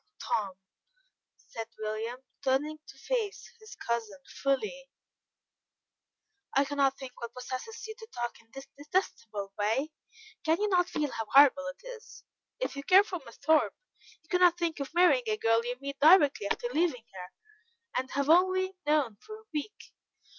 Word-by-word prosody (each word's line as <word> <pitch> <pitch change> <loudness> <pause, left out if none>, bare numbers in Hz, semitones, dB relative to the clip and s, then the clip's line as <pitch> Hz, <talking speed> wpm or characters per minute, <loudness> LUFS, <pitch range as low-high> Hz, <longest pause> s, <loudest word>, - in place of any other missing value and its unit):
"Tom," 200 -4 -1 0.8
said 225 -1 -8
William, 220 +3 -4 0.2
turning 295 +4 0
to - - -13
face 455 -5 -3
his 435 -1 -12
cousin 230 -4 -3 0.2
fully, 430 - -1 1.7
"I 275 +1 +4
cannot 275 -1 +1
think 255 -2 -10
what 235 0 -6
possesses 255 - -6
you 440 - -6
to 445 - -10
talk 240 -1 -5
in 225 - -30
this 270 0 -9
detestable 230 - -3
way. 235 +9 0 0.5
Can 320 +1 +2
you 420 - +1
not 360 -2 +3
feel 295 -2 -1
how 225 -1 -4
horrible 275 0 +6
it 275 +9 -8
is? - - -11 0.4
If - - -2
you 280 - -4
care 375 +6 +6
for 365 -5 -6
Miss 235 - -13
Thorpe, 315 +1 +3 0.5
you 315 - -30
cannot 360 -1 +4
think 335 -3 -2
of 280 - -4
marrying 365 +8 +5
a 430 - +1
girl 225 - +2
you 245 +1 -3
meet 280 0 -6
directly 290 - +6
after - - -1
leaving 290 -4 0
her, 180 -1 -9 0.6
and 260 +1 -1
have 280 +1 -1
only 375 +3 +3
known 290 -8 +2
for 430 - -11
a - - -19
week. 310 +9 -6
280 Hz, 160 wpm, -30 LUFS, 240-365 Hz, 1.7 s, horrible